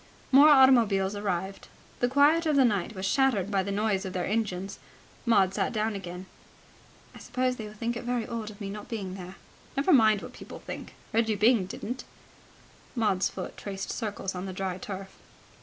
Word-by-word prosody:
More 280 +3 +8
automobiles 230 -9 +5
arrived. 195 -1 -3 0.3
The 245 - +2
quiet 295 +5 +4
of 305 - +2
the 270 -2 +6
night 210 -1 0
was 190 +1 -4
shattered 215 -4 +2
by 195 -1 +2
the 200 +1 -3
noise 205 -1 0
of 190 -2 -5
their 180 -1 -1
engines. 195 -3 -2 0.5
Maud 195 -5 +4
sat - - -1
down 220 0 0
again. 180 -2 -7 0.9
"I - - -12
suppose 250 +1 -1
they 220 - -6
will 210 - -11
think 230 +3 -2
it 240 - -5
very 240 -1 -1
odd 230 -2 -5
of 210 -1 -12
me 200 -2 -5
not 210 0 -8
being 200 -5 -4
there." 185 0 -8 0.4
"Never 290 +6 +3
mind 215 -6 +5
what - - -9
people - - -10
think. - - -8 0.2
Reggie 225 -1 +2
Byng 210 -2 +3
didn't." 245 +6 -6 0.9
Maud's 210 -5 +1
foot 185 - -7
traced 195 -1 -5
circles 205 -4 -4
on 185 +1 -5
the 190 - -5
dry 185 0 -3
turf. 195 0 -7
210 Hz, 190 wpm, -28 LUFS, 195-240 Hz, 0.9 s, More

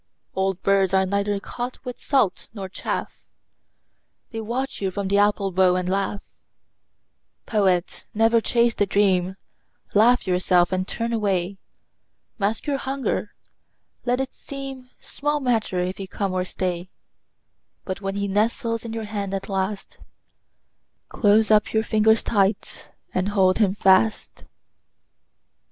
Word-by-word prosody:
Old 190 -1 0
birds 195 -1 +3
are 190 0 +4
neither 200 +1 0
caught 245 +5 -5
with 250 -1 -6
salt 260 -10 0
nor 195 -2 -5
chaff: 190 - -4 1.1
They 225 -1 -4
watch 250 +4 -3
you 195 - 0
from 195 +1 -3
the 200 +1 +3
apple 205 -1 +2
bough 180 0 +4
and 180 0 -1
laugh. 195 +1 -1 1.2
Poet, 190 -5 0
never 225 +1 +3
chase 235 +1 +2
the 205 - 0
dream. 190 -2 +2 0.6
Laugh 235 +4 +4
yourself 180 -1 +2
and 185 0 -1
turn 230 +1 -2
away. 195 -3 -1 0.8
Mask 210 +2 -1
your 285 -2 -1
hunger; 270 0 -2 0.7
let 245 +1 0
it 265 0 -3
seem 270 -2 -8
Small 295 +1 -2
matter 230 -8 0
if 180 +1 -3
he 195 - -6
come 195 -1 -3
or 185 0 0
stay; 180 -1 -3 1.0
But 190 +1 -4
when 195 0 -3
he 200 0 -1
nestles 230 +3 0
in 230 -1 -6
your 225 -1 -4
hand 200 -2 -3
at 195 - -5
last, 195 +1 -3 1.1
Close 215 +1 +3
up 210 -1 +3
your 220 0 +2
fingers 220 0 +3
tight 200 -1 0 0.2
and 185 +2 0
hold 190 -2 +3
him 200 -3 +3
fast. 195 +2 +2
200 Hz, 140 wpm, -23 LUFS, 190-225 Hz, 1.2 s, are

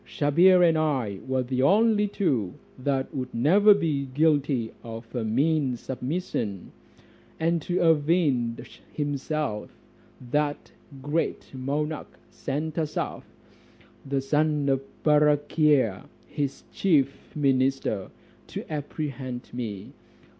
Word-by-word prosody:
Sabhir 175 +5 +4
and 160 -1 +2
I 130 -11 -1
were 130 -1 0
the 130 +1 -1
only 210 +7 +4
two 135 - -1 0.2
that 135 0 -1
would 130 -2 -4
never 200 - +6
be 145 -7 -1
guilty 140 -4 +1
of 115 0 -9
a 120 - -1
mean 135 +3 +1
submission: 125 - -4 0.7
and 165 +1 +1
to 175 +5 -1
avenge 150 -7 +1
himself, 145 -5 -2 0.6
that 145 0 -1 0.3
great 150 +1 -2
monarch 145 +4 -3
sent 155 +4 -3
Asaph, 155 -1 -3 0.8
the 135 0 -1
son 150 +1 +1
of 135 -1 +2 0.2
Barakhia, 150 - +3 0.2
his 140 -2 -4
chief 145 -8 0
minister, 135 -7 +1 0.4
to - - -7
apprehend 140 -4 -5
me. 110 -6 -5
145 Hz, 105 wpm, -26 LUFS, 130-155 Hz, 0.8 s, never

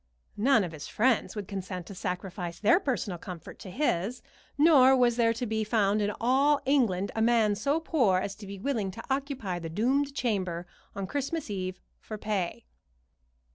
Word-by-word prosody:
None 225 0 +4
of 175 - -4
his 150 -2 -8
friends 240 +1 +1
would 205 -3 -5
consent 185 -3 -5
to 200 - -9
sacrifice 180 -2 -4
their 225 - +5
personal 230 - -2
comfort 175 -3 -9
to 190 - -9
his, 225 - -1 0.3
nor 275 -4 +6
was 245 -2 +3
there 230 -1 +3
to 230 +2 -3
be 220 -1 -1
found 210 -1 +2
in 205 0 +1
all 275 +4 +3
England 220 -9 +2
a 220 - 0
man 225 -2 +4
so 280 +10 0
poor 255 - +2
as 195 +1 -2
to 205 - -10
be 200 0 -7
willing 220 -2 -1
to 185 - -8
occupy 265 -10 -2
the 165 -1 -6
doomed 270 - 0
chamber 185 -9 -1 0.3
on 195 - -3
Christmas 285 - -3
Eve 185 -2 -4 0.2
for 215 - -7
pay. 210 +1 -3
215 Hz, 175 wpm, -28 LUFS, 190-260 Hz, 0.3 s, nor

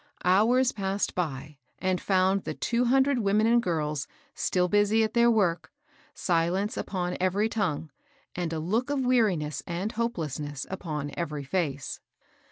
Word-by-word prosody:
Hours 230 +8 +4
passed 195 0 -2
by 150 -4 -4 0.2
and 185 -1 -1
found 190 0 +2
the - - -4
two 240 +1 0
hundred 265 +1 +3
women 210 0 +2
and 235 +1 +4
girls 150 - -2 0.3
still 180 -1 +1
busy 205 +3 +3
at 220 0 -1
their 235 0 +5
work, 175 -8 +1 0.4
silence 180 +6 0
upon 180 -2 -3
every 190 +4 +2
tongue, 175 -9 -2 0.4
and 175 -2 -3
a 165 - -2
look 215 - -1
of 275 -3 0
weariness 185 - +1
and 180 +5 -2
hopelessness 155 - -3
upon 150 -6 -4
every 150 -4 -3
fece. 140 -2 -2
185 Hz, 145 wpm, -27 LUFS, 160-220 Hz, 0.4 s, their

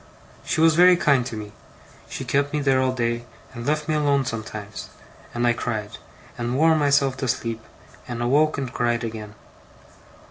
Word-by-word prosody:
She - - -1
was 165 0 +6
very 180 +2 +6
kind 140 -7 +3
to 110 - -6
me. 105 -1 -7 0.6
She - - -5
kept 140 +1 0
me 150 - +1
there 135 -2 +2
all 130 0 +2
day, 120 -1 -1 0.3
and 120 -1 -7
left 150 0 0
me 155 - 0
alone 145 -3 +2
sometimes; 110 -3 -6 0.4
and 120 0 -1
I 120 - +4
cried, 110 -3 -4 0.4
and 120 +2 -1
wore 160 +2 +5
myself 140 -3 +2
to 130 - -2
sleep, 115 -1 -2 0.5
and 120 -1 -5
awoke 145 +6 +2
and 130 -4 -4
cried 120 -1 0
again. 110 -2 -6
130 Hz, 175 wpm, -23 LUFS, 115-145 Hz, 0.6 s, was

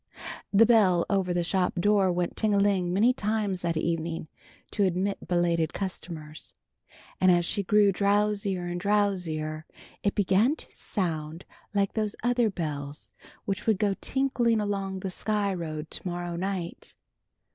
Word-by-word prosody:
The 210 +3 +6
bell 200 -7 +4
over 190 -2 +1
the 175 0 +1
shop 180 +1 0
door 195 +1 +3
went 175 0 -1
ting 215 -2 +1
a - - +3
ling 195 -3 +2
many 220 +7 +4
times 210 -5 -1
that 170 -2 -1
evening 165 -1 -2 0.4
to 205 - +1
admit 190 +2 -1
belated 170 -2 +1
customers, 165 -5 -6 0.6
and 185 - +5
as 175 -1 +3
she 200 - -1
grew 205 +1 +4
drowsier 200 -2 +1
and 175 0 -4
drowsier 175 -7 0 0.4
it 200 - 0
began 205 +7 +3
to - - -8
sound 165 -4 -3 0.3
like 200 -1 +1
those 215 -1 -1
other 240 -2 +2
bells 150 -6 -5 0.3
which 195 +2 -3
would 220 -3 +4
go 205 -1 +1
tinkling 250 -4 +1
along 195 -2 -2
the 190 - -3
Sky 205 +1 -1
Road 155 -3 -5
to - - -5
morrow 175 -1 -3
night. 180 -1 -4
190 Hz, 150 wpm, -27 LUFS, 175-205 Hz, 0.6 s, The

